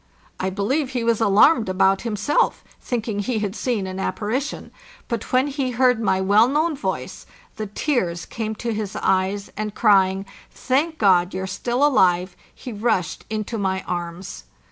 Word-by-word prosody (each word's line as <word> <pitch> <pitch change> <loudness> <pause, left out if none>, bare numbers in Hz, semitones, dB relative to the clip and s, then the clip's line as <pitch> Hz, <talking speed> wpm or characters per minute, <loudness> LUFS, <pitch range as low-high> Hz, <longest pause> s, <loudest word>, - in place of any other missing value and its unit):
I 190 - 0
believe 245 +9 -1
he 245 -2 -1
was 230 -1 +1
alarmed 220 +3 +5
about 190 +1 +3
himself, 220 +4 0 0.2
thinking 225 -4 -3
he 225 +3 -1
had 205 -1 -2
seen 235 -7 -1
an 185 0 -5
apparition; 230 +9 -3 0.4
but 235 -3 -4
when 255 +1 +3
he 275 -2 -2
heard 250 -1 +3
my 190 -4 +1
well 205 +4 +5
known 305 +4 +1
voice 280 - -4 0.3
the 215 - -4
tears 195 - -1
came 220 -1 -4
to 235 +1 -3
his 210 -2 -4
eyes, 190 +2 0
and, 210 0 -4
crying, 195 -3 +3 0.2
" - - -26 0.2
Thank 310 +5 +2
God, 185 -3 +3
you're 190 0 -3
still 240 +8 0
alive!" 185 -9 +3 0.2
he 250 - -8
rushed 210 -5 -1
into 215 +1 -3
my 190 -1 -1
arms. 175 +1 -5
215 Hz, 165 wpm, -22 LUFS, 190-245 Hz, 0.4 s, alarmed